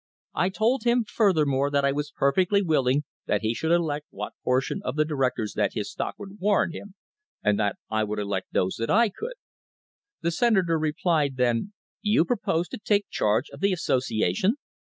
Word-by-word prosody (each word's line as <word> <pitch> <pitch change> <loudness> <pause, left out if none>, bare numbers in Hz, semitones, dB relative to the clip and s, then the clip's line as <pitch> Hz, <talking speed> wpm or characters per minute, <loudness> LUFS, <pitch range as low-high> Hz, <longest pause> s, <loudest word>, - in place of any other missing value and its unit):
I 180 - +1
told 225 +6 +1
him, 240 0 +3
furthermore, 150 - +2
that 140 -1 +1
I 140 - +3
was 145 +1 -2
perfectly 185 +10 +2
willing 145 -4 +2 0.2
that 105 - +1
he 110 +1 0
should 160 +7 -1
elect 155 -4 +1
what - - -6
portion 130 +1 0
of 125 - -3
the 155 0 +2
directors 130 -7 -1
that 105 -2 0
his 105 - -3
stock - - -4
would 200 0 -10
warrant 200 -3 +2
him, 200 -1 -9 0.5
and 105 0 +2 0.3
I 110 0 +1
would 105 0 -3
elect 100 -2 -2
those 90 - 0
that 115 - -2
I 230 +1 +4
could. 460 - -6 0.9
The 170 - 0
Senator 180 -5 +2
replied 155 -3 0
then: 125 - +1 0.3
'You 210 -5 +3
propose 175 -7 0
to - - -7
take 205 -1 0
charge 110 +7 +1
of - - -11
the 195 0 +2
association 125 - +1
155 Hz, 180 wpm, -26 LUFS, 125-195 Hz, 0.9 s, I